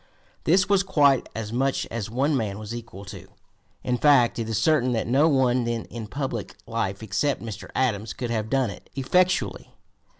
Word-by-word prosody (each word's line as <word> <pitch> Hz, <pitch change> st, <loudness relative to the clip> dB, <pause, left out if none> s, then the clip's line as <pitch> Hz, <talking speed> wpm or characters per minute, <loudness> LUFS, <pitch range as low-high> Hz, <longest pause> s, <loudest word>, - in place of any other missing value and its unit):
This 185 Hz, +4 st, +4 dB
was 200 Hz, -1 st, +4 dB
quite 145 Hz, -9 st, +3 dB
as 110 Hz, 0 st, -4 dB
much 135 Hz, +2 st, 0 dB
as 115 Hz, -2 st, -4 dB
one 135 Hz, +6 st, +1 dB
man 105 Hz, -6 st, -2 dB
was 110 Hz, +1 st, -7 dB
equal 115 Hz, -4 st, -8 dB
to; 95 Hz, -, -10 dB, 0.6 s
in 125 Hz, -1 st, -1 dB
fact, 135 Hz, -6 st, +4 dB
it 115 Hz, -1 st, -3 dB
is 110 Hz, -, 0 dB
certain 130 Hz, -4 st, +2 dB
that 110 Hz, -, -1 dB
no 140 Hz, +7 st, +4 dB
one 130 Hz, -3 st, +2 dB
then 115 Hz, -1 st, -2 dB
in 115 Hz, -2 st, -6 dB
public 130 Hz, -3 st, -4 dB
life 110 Hz, -3 st, -3 dB
except 135 Hz, +7 st, 0 dB
Mr. 110 Hz, -2 st, -7 dB
Adams 110 Hz, -5 st, 0 dB
could 120 Hz, -2 st, -4 dB
have 110 Hz, -1 st, -2 dB
done 130 Hz, -4 st, +1 dB
it -, -, -13 dB
effectually. 180 Hz, +7 st, +1 dB
120 Hz, 185 wpm, -25 LUFS, 110-140 Hz, 0.6 s, This